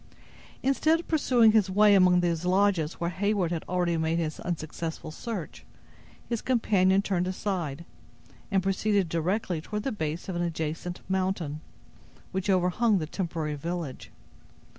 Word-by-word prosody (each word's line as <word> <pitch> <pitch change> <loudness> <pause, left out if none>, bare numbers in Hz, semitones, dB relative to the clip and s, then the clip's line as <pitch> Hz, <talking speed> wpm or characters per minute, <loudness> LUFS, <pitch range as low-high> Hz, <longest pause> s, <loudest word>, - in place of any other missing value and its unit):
Instead 310 +5 +3
of 345 - -9
pursuing 250 -8 +4
his 215 -3 +3
way 205 +2 +5
among 180 -2 +5
those 170 -1 0
lodges 185 -3 +2
where 170 0 -2
Heyward 195 -1 0
had 165 -2 -2
already 175 -2 +1
made 160 +1 0
his 155 -2 -2
unsuccessful 160 -1 -4
search, 200 -2 -6 0.6
his 235 -2 -2
companion 195 -6 +3
turned 180 -3 0
aside, 175 -5 -3 0.6
and 195 -3 +1
proceeded 195 0 +1
directly 175 +1 -1
toward 210 +5 -4
the 270 - -1
base 160 -5 -4
of 190 - -4
an 175 - -1
adjacent 165 +1 -3
mountain, 185 -5 -1 0.7
which 190 +1 -2
overhung 190 +4 +3
the 160 - -2
temporary 160 -2 -3
village. 165 -1 -5
180 Hz, 140 wpm, -28 LUFS, 165-205 Hz, 0.7 s, way